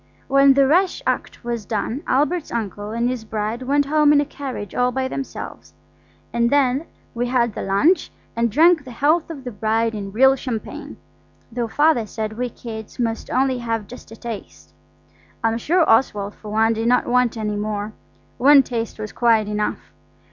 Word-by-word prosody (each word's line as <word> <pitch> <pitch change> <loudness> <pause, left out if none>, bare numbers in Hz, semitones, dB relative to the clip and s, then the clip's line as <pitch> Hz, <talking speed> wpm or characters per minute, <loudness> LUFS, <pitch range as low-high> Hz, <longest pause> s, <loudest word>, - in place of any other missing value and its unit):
When 275 0 +5
the 275 0 +5
rash 360 - +2
act - - -2
was 235 -2 -3
done 220 +6 -3
Albert's 300 +5 0
uncle 205 -2 -4
and 235 +2 -1
his 250 -2 -3
bride 215 +2 -3
went 285 +2 +1
home 300 +1 +4
in 295 - +5
a 290 - +1
carriage 265 -8 -7
all 250 0 +1
by 260 0 -1
themselves, 270 +1 -7 0.6
and 235 0 +2
then 280 +2 +2 0.3
we 240 0 -1
had 240 -3 +1
the - - -5
lunch 200 - +2 0.2
and 230 0 +1
drank 325 - +5
the 260 - -11
health 300 +8 +1
of 290 -5 -8
the 250 - -5
bride 225 +2 0
in 200 -2 -5
real 265 +5 +5
champagne, 245 -5 -6 0.5
though 235 0 -2
Father 290 -3 +2
said 215 +1 -4
we 245 +2 -3
kids 220 -2 -9
must 230 -2 -2
only 260 -1 +1
have 225 -3 -2
just 250 - -12
a 225 - -10
taste. 80 - -9 0.7
I'm 225 0 +1
sure 335 +6 +2
Oswald, 210 -3 +2
for 215 - -11
one, 220 +2 +2
did 225 +1 -2
not 250 +1 +3
want 245 -1 +1
any 210 -1 -2
more; 210 0 -3 0.5
one 275 +2 +7
taste 230 -3 -4
was 215 -1 -6
quite 225 -3 +2
enough. 210 0 -3
235 Hz, 180 wpm, -21 LUFS, 220-270 Hz, 0.7 s, one